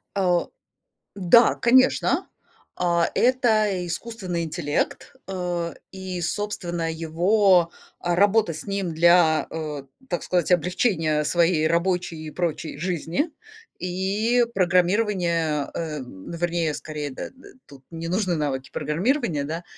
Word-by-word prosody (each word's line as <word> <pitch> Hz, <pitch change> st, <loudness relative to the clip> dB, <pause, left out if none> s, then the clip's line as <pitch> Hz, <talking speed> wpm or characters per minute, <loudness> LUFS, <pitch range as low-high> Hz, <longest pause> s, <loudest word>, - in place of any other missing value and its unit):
О, 180 Hz, -3 st, +1 dB, 0.7 s
да, 200 Hz, +5 st, +5 dB
конечно. 255 Hz, +2 st, +3 dB, 0.5 s
А 170 Hz, -1 st, +2 dB
это 240 Hz, -4 st, +3 dB
и 180 Hz, -2 st, -3 dB
искусственный 185 Hz, -4 st, -4 dB
интеллект, 155 Hz, -2 st, -3 dB
э, 175 Hz, -3 st, -3 dB, 0.2 s
и, 190 Hz, -2 st, -5 dB
собственно, 175 Hz, -3 st, -2 dB
его, 175 Hz, +2 st, +3 dB, 0.3 s
а, 175 Hz, 0 st, 0 dB
работа 205 Hz, -2 st, +3 dB
с 160 Hz, +5 st, -9 dB
ним 195 Hz, -4 st, -2 dB
для, 170 Hz, -1 st, +4 dB
э, 155 Hz, -3 st, -5 dB, 0.3 s
так 175 Hz, -, -1 dB
сказать, 180 Hz, -1 st, 0 dB
облегчения 165 Hz, -3 st, +1 dB
своей 165 Hz, 0 st, +2 dB
рабочей 170 Hz, -2 st, -1 dB
и -, -, -5 dB
прочей 165 Hz, -3 st, -3 dB
жизни. 180 Hz, -, -2 dB, 0.5 s
И 200 Hz, +7 st, +1 dB
программирования, 175 Hz, -5 st, +1 dB
э, 160 Hz, -2 st, -4 dB
м, 125 Hz, -8 st, -10 dB
вернее, 170 Hz, -2 st, -1 dB
скорее, 150 Hz, -2 st, -5 dB
д 130 Hz, -, -9 dB
э, -, -, -4 dB
э, 265 Hz, -, -17 dB
тут 140 Hz, -2 st, -16 dB
не 165 Hz, 0 st, -6 dB
нужны 185 Hz, -1 st, 0 dB
навыки 140 Hz, -4 st, -2 dB
программирования, 170 Hz, -, 0 dB
да. 165 Hz, +4 st, -4 dB
175 Hz, 125 wpm, -24 LUFS, 160-190 Hz, 0.7 s, да